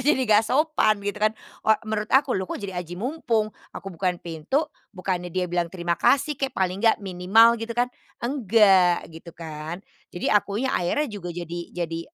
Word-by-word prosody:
jadi 265 0 +2
nggak 215 -1 +4
sopan 260 -8 +2
gitu 205 +1 -3
kan. 215 +1 +2 0.2
O - - -5 0.2
menurut 215 -1 -2
aku, 270 0 +3
"Loh 190 0 -2
kok - - -3
jadi 200 -2 -6
aji 175 0 -8
mumpung?" 225 - -1 0.2
Aku 195 -1 -8
bukan 180 +1 -1
pintu, 170 - -2 0.3
bukannya 180 -1 -2
dia 180 +1 -1
bilang 175 -1 -1
terima 170 -1 -2
kasih 280 +1 +2
kek, 270 -2 -2
paling 190 0 0
nggak 225 -2 +2
minimal 195 +5 +5
gitu 230 +1 -5
kan. 245 +1 +1 0.2
Enggak, 210 -8 +3
gitu 165 +1 -12
kan. 160 +2 -7 0.2
Jadi 175 - -2
akunya 210 +5 +1
akhirnya 180 +13 +1
juga 175 -4 -6
jadi 175 0 -5
jadi, 165 -1 -4
200 Hz, 180 wpm, -24 LUFS, 175-230 Hz, 0.3 s, minimal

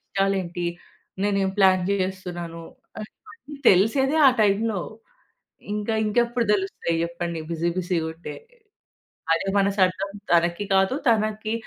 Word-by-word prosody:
ఇష్టాలేంటి? 190 -3 -2 0.6
నేనేం 195 -1 +1
ప్లాన్ 185 -2 +5
చేస్తున్నాను? 180 -3 -4 0.4
అ - - -5
ఇవన్నీ 360 -10 -14
తెలిసేదే 265 - +3
ఆ - - +8
టైంలో. 210 0 +1 0.9
ఇంకా 210 +1 -2
ఇంకెప్పుడు 235 +2 +1
తెలుస్తాయి 190 -4 -1
జేప్పండి 170 -1 -4
బిజీ 170 +1 -1
బిజీ‌గుంటే. 165 -2 -3 1.0
అదే 165 +4 0
మనసర్థం 195 -1 +1 0.2
తనకి 170 +3 +2
కాదు. 190 +6 +3
తనకి 215 -1 0
195 Hz, 105 wpm, -24 LUFS, 175-210 Hz, 1.0 s, ఆ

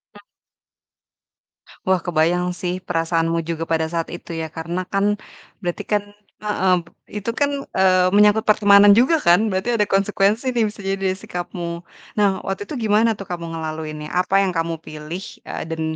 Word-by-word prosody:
Mhm. - - -13 1.7
Wah, 185 -1 +3
kebayang 175 +1 +2 0.2
sih 180 -1 -1
perasaanmu 165 0 0
juga 165 -1 -2
pada 160 -1 +1
saat 165 -1 -2
itu 175 - -8
ya, 160 - -3
karena 170 +3 -4
kan 205 +1 +1 0.4
berarti 175 -3 -3
kan 205 -1 +2 0.3
heeh, 200 -3 +1 0.4
itu 210 +2 -4
kan, 285 +3 +1 0.3
eee, 185 -1 +4
menyangkut 210 +1 +5
pertemanan 205 -1 +7
juga 260 +10 +4
kan 205 - +3
berarti 190 +5 -1
ada 210 -3 +2
konsekuensi 205 +5 +1
nih, 235 - +2
bisa 205 -1 -11
jadi 195 0 0
dari 190 -1 0
sikapmu. 175 -2 -5 0.4
Nah 205 -1 +4 0.2
waktu 195 0 -3
itu - - -4
gimana 215 +2 +4
tuh 195 - -7
kamu 175 -1 -4
ngelaluinya? 155 -1 -5
Apa 190 - -1
yang 185 - -1
kamu 165 0 0
pilih? 155 +4 -7 0.3
Eee, - - -5
dan 160 0 -4
185 Hz, 160 wpm, -21 LUFS, 170-205 Hz, 1.7 s, pertemanan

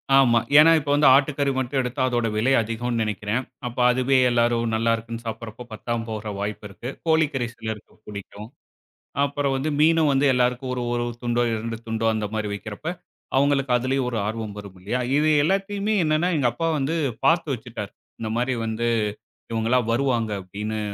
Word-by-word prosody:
ஆமா, 125 -4 +5 0.2
ஏன்னா 160 +2 +8
இப்ப 145 -1 -6
வந்து 145 +1 +5
ஆட்டுக்கறி 140 0 +2
மட்டும் 130 +1 -1
எடுத்தா 130 +1 -2
அதோட 120 -2 0
விலை 115 +5 +2
அதிகம்னு 115 +1 -2
நினைக்கிறேன். 105 +2 -2 0.3
அப்ப 120 +1 -6
அதுவே 130 +2 +2
எல்லோரும் 120 -1 +1
நல்லாயிருக்குன்னு 115 +1 -1
சாப்பிடறப்ப, 115 +1 -6
பத்தாம 115 +1 -3
போற 110 -1 -4
வாய்ப்பிருக்கு. 105 +3 -5 0.2
கோழிக்கறி 155 -6 +2
சிலருக்கு 110 -2 -7
புடிக்கும். 105 +1 -8 0.8
அப்புறம் 140 -1 -1
வந்து 135 +4 -2
மீனும் 160 -1 +4
வந்து 135 +1 +3
எல்லோருக்கும் 125 +1 0
ஒரு 125 - -3
1 120 0 0 0.2
துண்டோ 120 0 +1
2 115 +1 -3
துண்டோ 115 0 -1
அந்த 110 -1 -1
மாரி 110 -1 -1
வைக்கிறப்ப, 105 +6 -8 0.5
அவங்களுக்கு 135 -1 +2
அதிலயும் 130 +1 0
ஒரு 115 - -2
ஆர்வம் 110 -1 -4
வரும் 100 -2 -10
இல்லையா! 110 +7 -2 0.2
இது 155 +1 +3
எல்லாத்தையுமே 200 +4 0
என்னன்னா 155 +3 +2
எங்க 130 -4 +3
அப்பா 165 0 -1
வந்து 145 +4 -1 0.3
பார்த்து 165 0 +3
வச்சுட்டாரு. 110 -4 -7 0.3
இந்த 110 - -3
மாரி 125 +2 0
வந்து 110 +1 -2 0.7
இவங்கலாம் 115 +1 +1
வருவாங்க 120 -3 +1
அப்படீன்னு 105 +4 -5
120 Hz, 160 wpm, -24 LUFS, 110-135 Hz, 0.8 s, ஏன்னா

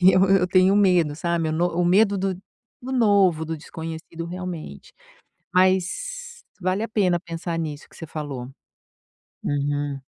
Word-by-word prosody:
que 185 +1 +7
eu 185 - +5
eu 195 -2 +4
tenho 185 +2 +4
medo, 180 -7 +3
sabe? 170 0 -1
O - - -2
no 170 +3 +2
o 175 +1 0
medo 200 +3 +4
do 190 0 -1 0.5
do 260 +2 -5
novo, 200 -9 +3
do 160 0 -4
desconhecido, 165 +1 -7
realmente, 175 - -7 0.6
mas 190 - 0 0.2
vale 185 +4 0
a - - -2
pena 185 -5 +2
pensar 170 0 -5
nisso 150 -2 -5
que - - -19
você 165 - -7
falou. 140 -5 -6 1.0
Uhum. 145 0 -1
175 Hz, 155 wpm, -24 LUFS, 160-190 Hz, 1.0 s, que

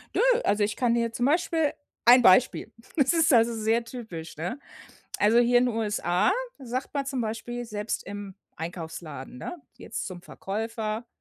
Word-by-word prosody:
Nö, - - +3 0.2
also, 205 0 +2
ich 210 - -1
kann 240 -2 +2
dir 230 -1 +1
zum 245 - 0
Beispiel 320 0 +2 0.3
ein 250 +1 +8
Beispiel: 230 +3 +4 0.3
Das 280 +3 +4
ist 325 -2 +4
also 230 0 +5
sehr 225 +1 +1
typisch, 215 -11 -8
ne? 180 - -4 0.6
Also 220 +3 +4
hier 245 0 +5
in 250 0 +2
USA, 210 -6 +1 0.3
sagt 255 0 -4
man 280 -2 -2
zum 270 -3 -2
Beispiel 240 +2 -4
selbst 210 -1 -4
im 200 -1 -7 0.2
Einkaufsladen, 160 -6 -7
ne, 355 - -6 0.2
jetzt 225 - -5
zum 180 -2 -7
Verkäufer: 220 +2 -4
225 Hz, 160 wpm, -27 LUFS, 205-245 Hz, 0.6 s, ein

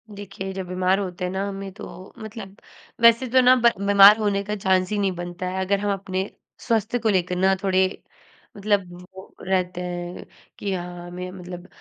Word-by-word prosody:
देखिए, 195 -1 -7
जब 190 -1 -5
बीमार 185 +1 +1
होते 185 -2 -5
हैं 180 - -3
ना 195 +1 -2
हमें 195 -1 -6
तो 190 -2 -11
मतलब 215 -3 -9 0.5
वैसे 235 +2 +6
तो 255 +2 +5
ना 255 +1 +6
ब 235 -2 +4 0.2
बीमार 200 +1 +8
होने 205 -2 0
का 210 +1 -3
चांस 190 -2 +1
ही 210 - -1
नहीं 195 -1 +1
बनता 175 +1 -5
है 190 +1 -3
अगर 200 +1 +1
हम 205 0 -1
अपने 190 0 -3 0.3
स्वास्थ्य 230 0 0
को 225 -1 0
लेकर 180 -3 +1
ना 190 +1 +3
थोड़े 190 -1 +3 0.7
मतलब 200 -2 +1 0.3
वो 190 +1 -13
रहते 180 -1 0
हैं 175 0 -6 0.3
कि 200 -1 -2
हाँ, 175 -1 -6
हमें 180 +1 -7
मतलब 180 -1 -9
190 Hz, 190 wpm, -23 LUFS, 180-205 Hz, 0.7 s, बीमार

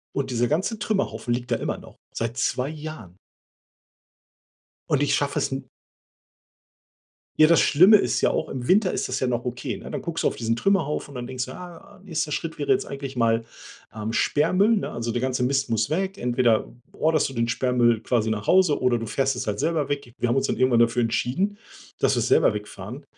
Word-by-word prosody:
und 140 -1 -2
dieser 120 0 +1
ganze 190 - -1
Trümmerhaufen 195 - -1
liegt 125 0 -5
da 115 - +2
immer - - -3
noch, - - -15 0.2
seit 115 +1 -3
2 130 +1 0
Jahren. 155 - -8 1.7
Und 145 -1 +2
ich 145 - +2
schaffe 145 0 0
es - - 0
n 135 -2 -5 1.7
ja, 155 0 +7
das 170 - +5
Schlimme 185 +8 +7
ist - - 0
ja - - +3
auch, - - -1
im 125 -2 -5
Winter 195 0 +4
ist - - -2
das 130 +1 -2
ja 130 - 0
noch 120 -1 -1
okay, 125 -1 -4
ne? - - -10
Dann - - -4
guckst - - -3
du - - +3
auf - - -5
diesen 115 0 0
Trümmerhaufen 150 -1 0
und - - -12
dann 120 -1 -5
denkst 130 -1 -4
du: 130 - -8
„Ah, 180 +2 -12
nächster 160 -5 -2
Schritt 165 +2 -4
wäre 145 - -2
jetzt 200 0 +2
eigentlich 135 -1 -7
mal, 115 -1 +2 0.5
ähm, 110 +1 -4
Sperrmüll, 185 - +2
ne? - - -2
Also, 120 0 -3
der 120 +1 -1
ganze 130 -1 -1
Mist 135 +1 +1
muss 110 +1 0
weg“. 190 +4 -1
Entweder 120 - +1 0.2
orderst 155 -1 +1
du 135 - -8
den 115 0 0
Sperrmüll 120 -2 +2
quasi 115 -3 0
nach 105 -1 -3
Hause 185 -5 +4
oder 125 -2 +2
du 115 - -5
fährst 135 +4 0
es 125 -3 -4
halt 105 - -2
selber 155 -1 0
weg. 140 -4 -4
Wir 120 - +1
haben 120 - +1
uns 135 - +2
dann - - -1
irgendwann 130 -2 +3
dafür 120 +1 +3
entschieden, 155 - -1 0.4
dass - - +2
wir - - 0
's - - -1
selber - - +4
wegfahren. - - -8
130 Hz, 215 wpm, -24 LUFS, 120-160 Hz, 1.7 s, ja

